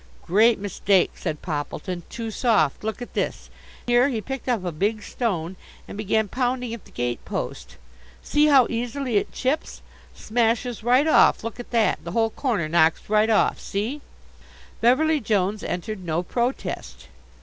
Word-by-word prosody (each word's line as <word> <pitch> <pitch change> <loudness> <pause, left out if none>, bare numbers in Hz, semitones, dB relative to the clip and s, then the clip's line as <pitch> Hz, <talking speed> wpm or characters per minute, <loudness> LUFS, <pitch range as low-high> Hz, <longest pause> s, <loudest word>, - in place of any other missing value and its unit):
"Great 220 +6 +4
mistake," 195 -1 +1
said 155 - -5
Poppleton. 175 +3 -4
"Too 230 -1 -5
soft. 210 - +1
Look 220 +3 -3
at - - -11
this" - - -3 0.3
here 245 +2 +4
he 235 -5 -2
picked 265 +3 -5
up 225 -7 0
a 175 - -1
big 205 +6 -1
stone 185 -8 -3 0.3
and - - -8
began 215 +1 0
pounding 250 +1 -1
at 230 - -8
the - - -18
gate 120 -1 -3
post - - -5 0.5
"see 300 +1 +3
how 275 -4 +6
easily 245 0 -2
it - - -1
chips! 275 +5 -2 0.3
Smashes 230 +1 0
right 250 +5 +4
off. 315 - +5
Look 230 +1 -6
at 245 - -8
that, 230 -2 +1
the 170 - -6
whole 225 -1 +2
corner 215 - -1
knocks 160 +4 +2
right 215 +1 +4
off, 220 - +3
see!" 225 +9 -3 0.8
Beverly 300 +6 +4
Jones 205 -3 0
entered 190 +3 -4
no 170 0 -1
protest. 240 +7 -3
220 Hz, 160 wpm, -24 LUFS, 190-245 Hz, 0.8 s, how